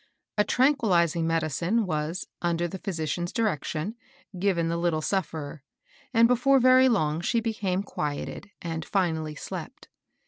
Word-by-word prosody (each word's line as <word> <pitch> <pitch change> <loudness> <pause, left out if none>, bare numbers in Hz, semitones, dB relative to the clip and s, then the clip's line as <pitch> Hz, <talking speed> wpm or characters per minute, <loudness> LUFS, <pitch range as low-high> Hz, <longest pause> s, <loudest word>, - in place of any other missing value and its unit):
A 210 - +4
tranquillizing 180 - +2
medicine 165 +7 0
was, 155 +1 -2 0.2
under 175 0 0
the 185 +3 -7
physi 165 -3 -3
cian's 175 +4 -2
direction, 190 -3 -1 0.5
given 175 -4 +1
the 170 0 -1
little 170 -2 0
sufferer, 160 -6 -2 0.5
and 230 -2 +5
be 250 - +4
fore 270 +3 +4
very 255 +1 +6
long 160 -8 +1
she 230 +7 +1
became 205 -4 -1
quieted, 150 +4 -4
and 165 -1 -3
finally 160 -6 -1
slept. - - -8
175 Hz, 140 wpm, -27 LUFS, 160-215 Hz, 0.5 s, very